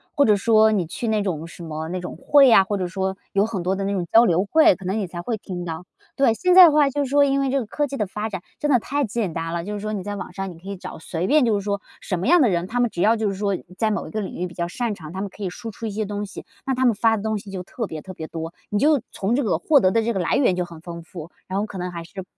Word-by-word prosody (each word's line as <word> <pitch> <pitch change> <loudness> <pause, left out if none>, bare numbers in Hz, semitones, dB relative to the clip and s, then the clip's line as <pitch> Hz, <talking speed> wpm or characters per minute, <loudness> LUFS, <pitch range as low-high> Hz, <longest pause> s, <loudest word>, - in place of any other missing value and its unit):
或 285 - +5
者 210 -1 +4
说 220 +1 +4
你 195 -5 +1
去 225 +7 -4
那 215 -1 +1
种 165 -5 -3
什 170 - -11
么 160 0 -5
那 185 - -3
种 180 - -7
会 280 -2 +5
啊， 210 -4 +7
或 205 +2 -2
者 185 -2 -2
说 190 +1 -3 0.2
有 200 +1 +3
很 220 -5 -3
多 185 +2 0
的 195 - -3
那 195 - -1
种 185 -3 -1
交 230 +1 +8
流 185 -2 +2
会， 315 +6 +5
可 190 - -12
能 190 +4 -1
你 205 - -1
才 175 -1 -7
会 230 +6 -2
听 180 -3 -6
到。 165 +1 -6 0.3
对， 270 -4 +3
现 360 +10 +2
在 370 -1 +12
的 330 - +6
话 295 -1 +4
就 285 +1 -1
是 260 - -4
说 285 0 +5
因 275 0 +1
为 270 - 0
这 275 +1 +1
个 240 - -3
科 290 +7 -1
技 275 0 -5
的 210 - -1
发 210 +3 -4
展 190 -4 -5 0.2
真 295 - 0
的 250 - +5
太 285 +5 -1
简 215 -6 -2
单 165 0 -3
了， 170 0 -3
就 210 - -4
是 205 - -5
说 215 - -3
你 205 -3 -3
在 205 +2 -5
网 200 - -7
上 195 0 -5
你 175 - -11
可 185 +4 -11
以 200 - -5
找， - - -8
随 165 +2 -3
便 300 0 +4
就 220 -4 +2
是 - - -5
说 200 -1 -1 0.2
什 185 - -3
么 185 - -2
样 350 +4 +6
的 265 - +5
人， 175 -2 0
他 245 +3 -2
们 240 -1 +3
只 175 - -4
要 225 +3 +4
就 220 - 0
是 195 - -2
说 200 0 -1 0.2
在 220 -1 +1
某 205 - -2
一 - - -10
个 215 - -2
领 190 - -6
域 180 - -2
比 175 - -12
较 170 0 -2
擅 230 +1 -2
长， 155 -4 -10
他 185 - -6
们 200 +1 -3
可 205 - -10
以 190 - -1
输 225 +6 -7
出 225 - -8
一 - - -4
些 215 +1 -2
东 205 0 -4
西， 195 - -10 0.2
那 270 - 0
他 260 +1 +1
们 235 -4 +4
发 225 +1 +3
的 205 - -6
东 220 -1 -1
西 200 -1 -9
就 185 -2 -5
特 225 +5 -5
别 160 -6 -7
特 185 - -9
别 160 -3 -7
多， 165 +1 -6 0.2
你 205 - 0
就 290 +1 +4
从 205 +5 -1
这 280 - +1
个 195 -8 +1
获 280 - +4
得 185 - +4
的 230 - +2
这 235 +1 -1
个 190 - -1
来 175 - +1
源 245 -10 +3
就 180 - 0
很 170 -2 -10
丰 170 0 -8
富， 165 -1 -10 0.2
然 190 +2 -2
后 210 - 0
可 205 - -8
能 180 0 -4
还 170 -1 -6
是 190 +2 -8
200 Hz, 370 characters per minute, -23 LUFS, 180-230 Hz, 0.3 s, 在